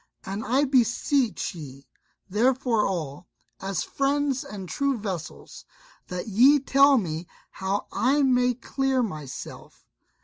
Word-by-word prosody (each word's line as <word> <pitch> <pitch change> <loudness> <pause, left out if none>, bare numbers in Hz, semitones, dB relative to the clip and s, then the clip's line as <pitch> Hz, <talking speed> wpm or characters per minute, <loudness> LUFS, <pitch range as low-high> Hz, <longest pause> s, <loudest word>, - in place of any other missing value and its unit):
And 200 +3 -4
I 265 +6 +2
beseech 255 -1 +1
ye 140 -5 -10 0.4
therefore 235 +2 +2
all, 165 -3 -4 0.3
as 190 -2 -2
friends 280 0 0
and 205 -9 -8
true 280 +5 0
vassals, 190 -7 -6 0.4
that 180 +3 -5
ye 255 +8 +5
tell 275 +1 +5
me 165 -5 -3 0.2
how 195 +1 -2
I 280 +4 +2
may 250 -2 +3
clear 265 +1 0
myself." 150 - -8
230 Hz, 115 wpm, -25 LUFS, 185-270 Hz, 0.4 s, ye